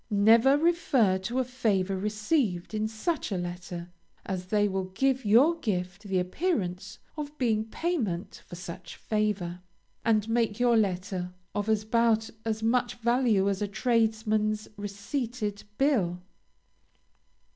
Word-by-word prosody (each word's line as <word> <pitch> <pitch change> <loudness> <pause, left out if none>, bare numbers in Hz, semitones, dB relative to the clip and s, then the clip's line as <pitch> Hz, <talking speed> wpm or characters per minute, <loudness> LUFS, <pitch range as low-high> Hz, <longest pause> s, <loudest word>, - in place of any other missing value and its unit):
Never 225 +6 +5
refer 290 - +3
to 215 +7 -3
a 260 - +3
favor 210 -7 0
received, 210 - -1
in 215 0 0
such 225 +7 -2
a 195 - 0
letter, 175 0 -6 0.3
as 185 -2 -4
that 205 0 +2
will 190 0 -1
give 260 +7 0
your 275 +11 +5
gift 185 - -2
the 195 -3 -2
appearance 195 - -2 0.2
of 300 -1 -6
being 220 -5 +1
payment 220 - -2
for - - -8
such 175 0 -8
favor, 205 -5 -1 0.4
and 215 -2 +2
make 225 -2 0
your 245 -1 +4
letter 185 -3 -1 0.2
of 205 +1 -2
about 220 +1 +2
as 220 0 -2
much 245 +2 +1
value 235 -4 +2
as 200 0 0
a 205 - 0
tradesman's 215 -1 +1
receipted 210 +1 -4
bill. 190 -11 +1
215 Hz, 130 wpm, -28 LUFS, 190-240 Hz, 0.4 s, Never